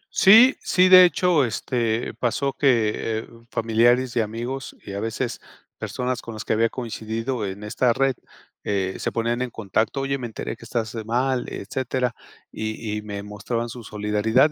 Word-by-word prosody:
Sí, 225 +7 +8
sí, 185 0 +3
de 185 0 +10
hecho, 175 -4 +3
este, 115 -1 -1
pasó 130 +3 -1
que, 120 -7 +3 0.3
eh, - - -13 0.2
familiares 120 +3 +2
y - - +2
amigos, 120 +5 -5
y 100 - -7
a 100 - -3
veces 115 +2 -3 0.4
personas 125 0 -3
con 115 - -8
las 110 - -7
que - - +1
había 115 +1 +2
coincidido 115 0 -4
en 95 +2 -7
esta 120 +3 +1
red, 135 +2 +2 0.5
eh, 95 -2 -1
se - - -2
ponían 115 +1 -1
en 125 - -1
contacto: 110 +5 -1
"Oye, 135 0 -1
me 120 - -4
enteré 110 - -5
que 115 - -14
estás 115 -1 -3
mal", 125 +3 0
etcétera. 125 +3 -2 0.4
Y 110 0 -4
y - - -8
me 100 -1 -6
mostraban 105 +4 -4
su 120 0 -8
solidaridad 105 +6 +2
115 Hz, 170 wpm, -23 LUFS, 110-130 Hz, 0.5 s, de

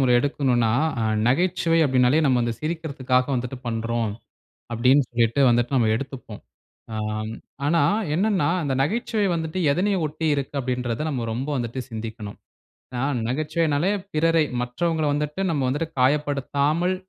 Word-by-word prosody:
அ - - +1
எடுக்கணுனா 125 -3 +1 0.6
நகைச்சுவை 170 +4 +2
அப்டின்னாலே 130 +1 +3
நம்ம 130 -3 +3
வந்து 120 0 0
சிரிக்கறதுக்காக 140 -6 -1
வந்துட்டு 125 +1 -3
பண்றோம். 115 -1 -1 0.6
அப்டின்னு 130 +4 +4
சொல்லிட்டு 115 +1 +1
வந்துட்டு 120 +3 +2
நம்ம 115 -4 +3
எடுத்துப்போம். 125 -4 -7 0.5
ஆம், 110 0 -3 0.3
ஆனா 165 +3 +3 0.3
என்னன்னா 190 -5 +2
அந்த 140 -3 -1
நகைச்சுவை 215 - 0
வந்துட்டு 160 +2 -3
எதனை 190 +7 +1
ஒட்டி 155 +2 -2
இருக்கு 140 0 -4
அப்டின்றத 125 +1 -2
நம்ம 125 -6 -3
ரொம்ப 130 +5 -3
வந்துட்டு 120 +1 -3
சிந்திக்கணும். 110 -2 -7 0.6
ஆ - - -1 0.3
நகைச்சுவைன்னாலே 155 +5 0 0.2
பிறரை 165 0 +3 0.2
மற்றவங்கள 160 +5 -1
வந்துட்டு 150 +5 -2
நம்ம 145 -4 0
வந்துட்டு 150 +5 -1
காயப்படுத்தாமல் 145 +5 +1
140 Hz, 125 wpm, -24 LUFS, 120-160 Hz, 0.6 s, அப்டின்னு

